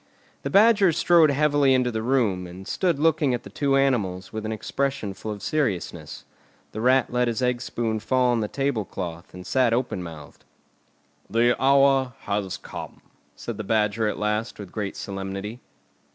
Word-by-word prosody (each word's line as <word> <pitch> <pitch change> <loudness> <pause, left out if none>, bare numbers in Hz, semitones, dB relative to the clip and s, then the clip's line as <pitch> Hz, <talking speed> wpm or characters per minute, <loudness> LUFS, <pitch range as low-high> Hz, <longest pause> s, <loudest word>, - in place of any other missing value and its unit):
The - - -3
Badger 205 -2 +5
strode 165 -1 +5
heavily 145 -1 +3
into 125 -1 +1
the 110 -1 -2
room, 110 -7 +1
and 95 +2 -10
stood 175 -5 0
looking 150 -3 +2
at 120 - -7
the - - -11
two 140 -2 +1
animals 105 -10 0
with 110 0 -4
an - - -3
expression 110 -1 -2
full 95 +3 -8
of 105 -1 -7
seriousness. 130 - -2 0.5
The 110 - -5
Rat 125 0 +3
let 125 0 +2
his 120 +2 -1
egg 125 -1 0
spoon 115 -3 -2
fall 125 +3 +2
on 120 - +1
the 105 - -1
table 135 -3 -1
cloth, 85 -2 -7
and 90 0 -9
sat 125 0 +2
open 120 -6 -1
mouthed. 80 -4 -10 0.9
"The 115 +3 +3
hour 135 -2 +4
has 100 -2 -2
come!" - - -9 0.3
said 120 -3 -6
the 105 - -4
Badger 110 +1 +1
at 105 - -2
last 105 +1 -2
with 100 -3 -9
great 105 -3 -4
solemnity. 100 +3 -5
115 Hz, 175 wpm, -24 LUFS, 100-135 Hz, 0.9 s, Badger